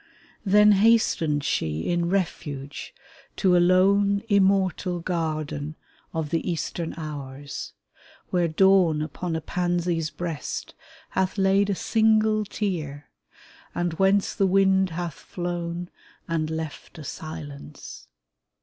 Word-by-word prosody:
Then 210 +1 +6
hastens 195 -9 +3
she 80 - -1
in 170 0 +1
refuge 150 -7 -3 0.4
to 185 -3 +3
a - - +6
lone, 200 +3 +4
Immortal 190 -2 +2
garden 155 -3 -3 0.4
of 160 -2 -3
the 165 +2 -1
eastern 170 0 -3
hours, 145 -3 -6 0.6
Where 175 -2 +2
Dawn 170 -2 +4
upon 165 +2 -4
a 160 - -2
pansy's 175 -2 -1
breast 165 -3 -5 0.4
hath 190 +1 0
laid 195 +1 +3
A 200 - +1
single 215 0 +2
tear, 160 -9 -4 0.6
and 175 -1 -1
whence 195 +3 +2
the 195 -2 +2
wind 190 0 +4
hath 170 -1 -4
flown 175 0 -5 0.4
And 160 -2 -1
left 160 -1 -6
a 155 - -8
silence. 145 -1 -8
175 Hz, 115 wpm, -25 LUFS, 155-195 Hz, 0.6 s, Then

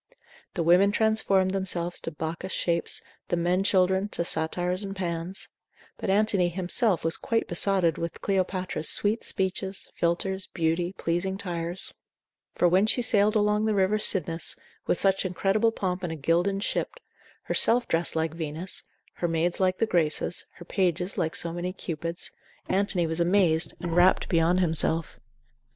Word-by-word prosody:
The 170 - 0
women 180 +4 +5
transformed 205 -4 +2
themselves 180 -3 -2
to - - -4
Bacchus 165 +4 -5
shapes, 170 -1 0 0.2
the 175 - -1
men 175 +3 +1
children 190 +1 +2
to 170 - -1
Satyrs 175 +4 -1
and 195 0 -5
Pans; 175 0 -3 0.5
but - - -4
Antony 195 -3 +2
himself 185 +3 0
was 165 - +2
quite 230 -1 -1
besotted 175 -2 +2
with 170 0 -4
Cleopatra's 185 -4 0
sweet 215 +3 +2
speeches, 190 0 -2
philters, 190 +3 -1
beauty, 170 +2 -1
pleasing 185 +1 -2
tires: 175 -2 -2 0.6
for 175 - +3
when 185 +4 +3
she 245 +2 +2
sailed 210 -1 +3
along 210 0 +2
the 215 -1 +1
river 200 +2 +2
Cydnus, 170 -5 +1 0.3
with - - +2
such 195 -1 +1
incredible 195 +4 +1
pomp 185 -3 -3
in 175 - -2
a 160 - -4
gilded 175 +6 0
ship, - - -2 0.5
herself 240 +1 +3
dressed 165 0 0
like 160 0 -1
Venus, 165 +2 -3 0.4
her 175 - -1
maids 165 +1 +1
like 185 -1 +1
the - - +2
Graces, 170 -3 0
her 175 - -12
pages 180 0 -1
like 160 -1 -1
so 170 -1 0
many 175 +1 -4
Cupids, 170 -2 -4 0.4
Antony 190 -2 +1
was 160 +1 0
amazed, 170 -2 +2
and 170 -2 -3
rapt 180 +1 +4
beyond 170 +2 +2
himself. 165 -1 0
180 Hz, 155 wpm, -26 LUFS, 170-195 Hz, 0.6 s, women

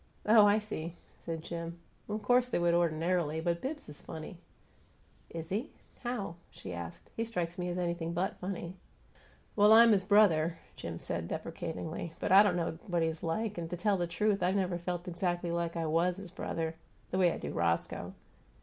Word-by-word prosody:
"Oh, 215 -1 +7
I 205 +1 +5
see!" 175 -6 -5 0.3
said 165 -1 -3
Jim. 170 0 -5 0.3
"Of 210 0 -3
course 245 +3 +4
they - - +1
would 175 0 +3
ordinarily, 165 -1 +1
but 170 +1 0
Bibbs 295 +3 -4
is 150 - -11
funny." 160 +2 -8 0.9
"Is 165 -1 -6
he? 220 +10 -2 0.3
How?" 215 -8 -3
she 90 - -8
asked. 85 -1 -8
"He 225 - 0
strikes 175 -7 -3
me 180 0 -1
as 175 - -2
anything 170 -2 -1
but 175 +3 -1
funny." 180 -1 -5 0.8
"Well, 210 0 +6
I'm 230 +1 +9
his 195 -3 +4
brother," 175 -5 +4 0.2
Jim 85 0 -5
said, 85 0 -3
deprecatingly, 160 - -4
"but - - -1
I 195 +1 +10
don't 205 -4 +3
know 165 -2 -2
what 175 -3 +1
he's 160 0 -1
like, 210 +4 -1
and, 165 -1 -4
to 175 - -4
tell 200 +3 +2
the 175 -1 -1
truth, 200 +3 +1
I've 180 +2 +2
never 185 -3 0
felt 175 0 -4
exactly 175 0 -1
like 170 0 -1
I 165 - -1
WAS 170 +3 +2
his 195 -3 -9
brother, 165 -3 -3 0.4
the 185 - 0
way 180 -2 +5
I - - -3
do - - -5
Roscoe. 85 -1 -1
175 Hz, 190 wpm, -32 LUFS, 165-195 Hz, 0.9 s, I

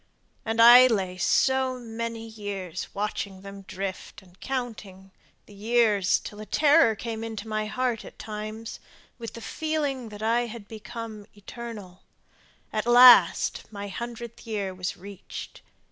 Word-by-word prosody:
And 225 0 -2
I 240 +2 +10
lay 190 -6 -1
so 265 +4 +2
many 230 -1 -5
years 200 -5 -6
watching 200 -2 -4
them 200 0 -9
drift 190 0 -7
and 180 0 -22
counting 215 -7 -6 0.3
The 210 - -16
years 210 -2 +2
till 210 0 -9
a - - -7
terror 295 -6 +4
came 225 +1 -5
in 225 -1 -6
my 215 -1 -2
heart 240 0 -2
at - - -13
times, 215 +1 -7 0.4
With 230 -1 -7
the 230 - -9
feeling 290 -5 -3
that 210 0 -9
I 235 +2 +1
had 225 -3 -9
become 220 -1 -8
eternal; 205 -3 -9 0.7
at 215 +2 -2
last 245 -1 +6
My 200 -1 -6
hundredth 235 +2 -7
year 200 -4 -3
was 180 -1 -4
reached! 200 +1 -10
220 Hz, 140 wpm, -26 LUFS, 200-235 Hz, 0.7 s, I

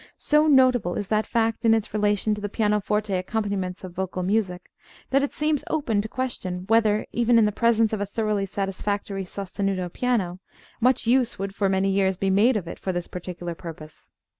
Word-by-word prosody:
So 300 +1 +3
notable 255 - +4
is 200 - -4
that 215 0 +1
fact 225 -1 0
in 225 -1 +5
its 220 -1 -3
relation 210 0 +1
to 210 - -5
the 205 - -3
pianoforte 210 -1 0
accompaniments 190 -1 -2
of 185 -2 -8
vocal 185 0 -3
music, 185 -2 -1 0.4
that 275 +1 +4
it 280 - -1
seems 300 -1 0
open 245 -10 0
to 215 - -5
question 215 -8 -3
whether, 215 -2 +3
even 235 0 +3
in 225 - +5
the 210 - +1
presence 225 0 +2
of 210 - -1
a - - 0
thoroughly 210 -1 -1
satisfactory 195 0 -3
sostenuto 195 -1 -3
piano, 205 -8 -1 0.4
much 250 +1 +2
use 240 0 +2
would 195 0 -4
for 200 -1 0
many 190 0 +1
years 190 -1 +1
be 195 0 0
made 215 +5 +4
of 180 -5 -5
it - - -7
for 190 - -2
this 175 -1 -3
particular 175 -1 -6
purpose. 160 -2 -10
205 Hz, 190 wpm, -24 LUFS, 190-225 Hz, 0.4 s, in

